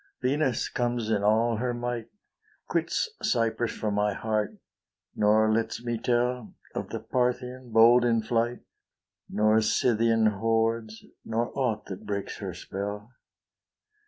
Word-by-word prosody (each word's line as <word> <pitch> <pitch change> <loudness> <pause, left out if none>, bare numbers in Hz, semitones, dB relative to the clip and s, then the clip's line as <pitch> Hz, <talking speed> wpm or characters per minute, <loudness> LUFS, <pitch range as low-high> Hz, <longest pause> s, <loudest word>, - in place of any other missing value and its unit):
Venus 135 -1 0
comes 120 -2 -1
in 105 -2 +2
all 110 +2 +3
her 120 +1 -1
might, 120 -1 -3 0.6
Quits - - 0
Cyprus 115 -1 +1
for 105 - -3
my 105 0 +1
heart, 110 -1 -2 0.6
nor 110 +1 +4
lets 115 +1 -1
me 120 -1 -1
tell 125 0 0 0.2
Of - - -4
the - - -4
Parthian, 125 0 -2
hold 115 +2 +6
in 115 -2 +2
flight, 120 +2 0 0.7
Nor 110 +1 +3
Scythian 115 0 +2
hordes, 115 +1 0 0.2
nor 115 +1 -1
aught 120 -6 -1
that 95 -1 -8
breaks 100 -1 -3
her - - -6
spell. 105 +3 -6
115 Hz, 130 wpm, -27 LUFS, 110-120 Hz, 0.7 s, hold